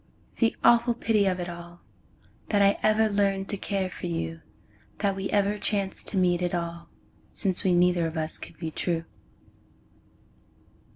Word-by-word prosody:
the 230 -1 +2
awful 235 0 +5
pity 220 -4 +2
of 185 -1 0
it 175 - -3
all, 175 0 -9 0.7
That 205 - +2
I 200 0 +5
ever 215 +1 +3
learned 200 -2 0
to - - +5
care 195 -1 -2
for 185 - -6
you, 80 -1 -4 0.6
That 200 -1 0
we 195 0 -3
ever 205 0 +1
chanced 200 -3 -1
to 200 - 0
meet 180 -1 +2
at 175 0 -1
all, 170 0 -5 0.4
Since 190 -2 0
we 185 -3 +3
neither 175 -1 +3
of 160 0 -6
us 160 0 -1
could - - -10
be 160 -1 -5
true. 165 0 -2
190 Hz, 165 wpm, -26 LUFS, 170-205 Hz, 0.7 s, awful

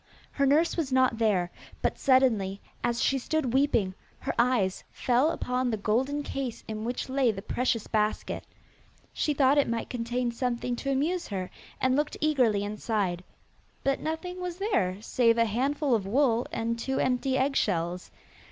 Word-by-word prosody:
Her 280 -1 +1
nurse 310 +5 +3
was 305 -5 -1
not 255 -3 +3
there, 190 -6 +2 0.3
but - - 0
suddenly, 225 -8 +3 0.2
as 235 0 0
she 270 - +2
stood 265 -2 -1
weeping, 235 -9 +2 0.3
her - - -2
eyes 235 -6 +2
fell 255 +5 +2
upon 250 -5 -1
the 220 - -1
golden 260 +8 0
case 270 -4 -4
in 215 0 -4
which 245 +1 -3
lay 260 -2 +2
the 195 -2 -7
precious 235 -1 0
basket. 215 -1 -1 0.7
She 300 - 0
thought 275 +1 +4
it 280 - +2
might 230 0 -3
contain 240 0 -1
something 245 0 -2
to 275 - -2
amuse 325 +7 0
her, 185 -3 -4 0.3
and 260 0 +2
looked 295 +1 -1
eagerly 250 -10 +2
inside, 205 -4 -2 0.6
but 275 0 +1
nothing 360 +3 -4
was 360 -1 -4
there 225 - 0
save 230 -1 +3
a 230 - +4
handful 270 +5 0
of 205 -4 +1
wool 240 +1 +2
and 230 +1 -2
two 265 +3 -2
empty 260 +1 +1
eggshells. 180 -10 0
250 Hz, 160 wpm, -28 LUFS, 220-275 Hz, 0.7 s, thought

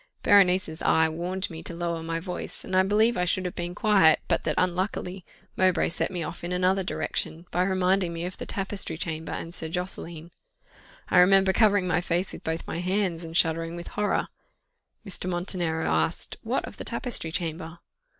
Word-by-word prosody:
Berenice's 185 -5 +4
eye 160 0 +4
warned 175 +4 -2
me 160 0 -7
to 170 - -4
lower 170 -1 -2
my 165 0 -2
voice, 180 +1 -5
and 185 - -3
I 185 - +6
believe 215 +5 +3
I 180 - +1
should 185 +1 +1
have 180 - -3
been 175 +1 -4
quiet, 195 -8 +5
but - - 0
that 155 - 0
unluckily, 185 0 -1 0.3
Mowbray 185 -2 +3
set - - -1
me 180 -3 -3
off 170 - -7
in 175 - -4
another 185 +2 +2
direction, 170 -2 -3
by 180 - +1
reminding 185 -1 +2
me 170 +1 -4
of 185 - -5
the - - -6
tapestry 195 -4 -2
chamber 160 -1 -4
and 165 - -5
Sir 160 -2 -3
Josseline. 170 -1 -4 0.8
I 180 - +5
remember 190 +1 +5
covering 205 -3 +4
my 175 -1 +2
face 175 +2 -1
with - - -9
both 160 +1 -3
my 165 - -4
hands, 180 -2 0
and 165 0 -3
shuddering 165 0 +1
with 175 0 -7
horror. 210 0 0 0.8
Mr. 185 -2 -1
Montenero 175 -2 -1
asked, 80 0 0
"What - - -1
of - - -10
the - - -5
tapestry 160 - -3
chamber?" 165 0 -4
180 Hz, 190 wpm, -27 LUFS, 165-190 Hz, 0.8 s, I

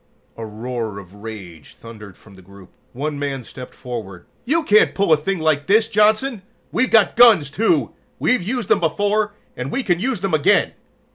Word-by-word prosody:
A 115 - -8
roar 110 0 -5
of 95 -2 -12
rage 100 -7 -11
thundered 105 -4 -13
from 105 - -19
the 95 - -16
group. 95 0 -17 0.2
One 145 +3 -4
man 140 -3 -4
stepped 125 +2 -11
forward. 110 -8 -8 0.2
"You 320 +6 +1
can't 215 -6 +3
pull 195 -5 +2
a - - +7
thing 185 +6 -3
like 155 -3 0
this, 220 +2 +3
Johnson. 215 +2 +1 0.3
We've 255 +2 +1
got 220 -3 +3
guns, 215 - +6
too. 225 - +1 0.3
We've 250 - +1
used 225 +3 -3
them - - +4
before, 205 +5 0 0.2
and 130 +2 -5
we 270 - -2
can 175 -5 0
use 245 -1 -2
them 195 -3 -2
again!" 155 -2 +2
155 Hz, 185 wpm, -20 LUFS, -, 0.3 s, a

